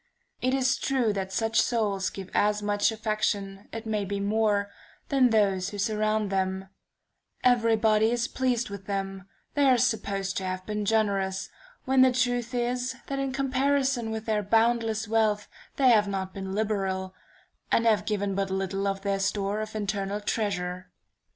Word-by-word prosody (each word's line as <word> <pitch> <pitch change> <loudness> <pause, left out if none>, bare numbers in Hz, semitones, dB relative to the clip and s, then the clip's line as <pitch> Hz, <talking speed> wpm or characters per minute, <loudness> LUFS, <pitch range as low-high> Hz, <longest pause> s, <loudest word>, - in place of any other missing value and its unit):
It 255 +1 +1
is 260 0 +2
true 250 -6 +1
that 190 -1 -3
such 225 +3 +2
souls 205 -5 0
give 190 -1 -9
as 210 0 +2
much 205 +1 +2
affection, 210 -2 -2
it 225 0 -6
may 215 -2 -1
be 200 +1 -3
more, 205 0 +1 0.4
than 265 -3 +4
those 200 -4 +2
who 205 - -7
surround 215 0 0
them; 190 0 -1 0.7
every 230 -2 +4
body 220 0 +3
is 240 0 0
pleased 250 -4 -1
with 200 -1 -8
them, 195 -1 -4 0.2
they 285 -1 +3
are 255 - +5
supposed 200 -5 -1
to 190 - -2
have 185 0 -4
been 210 -1 -3
generous, 200 -3 0 0.3
when 265 -1 +4
the 260 0 +6
truth 245 -1 0
is 245 +1 -1
that 275 0 -3
in 270 -1 -1
comparison 270 -2 +1
with 220 0 -4
their 215 -2 +1
boundless 225 +1 +1
wealth 215 -2 +1 0.3
they 265 -2 +4
have 210 -3 +5
not 190 -1 -3
been 190 0 -5
liberal, 195 -3 -1 0.6
and 230 - +3
have 210 -2 +3
given 205 -2 -1
but 195 0 -1
little 195 +1 -1
of 195 0 -2
their 200 -1 0
store 200 +1 -1
of 215 0 -6
internal 200 -1 -2
treasure. 185 -4 -2
210 Hz, 165 wpm, -27 LUFS, 195-230 Hz, 0.7 s, the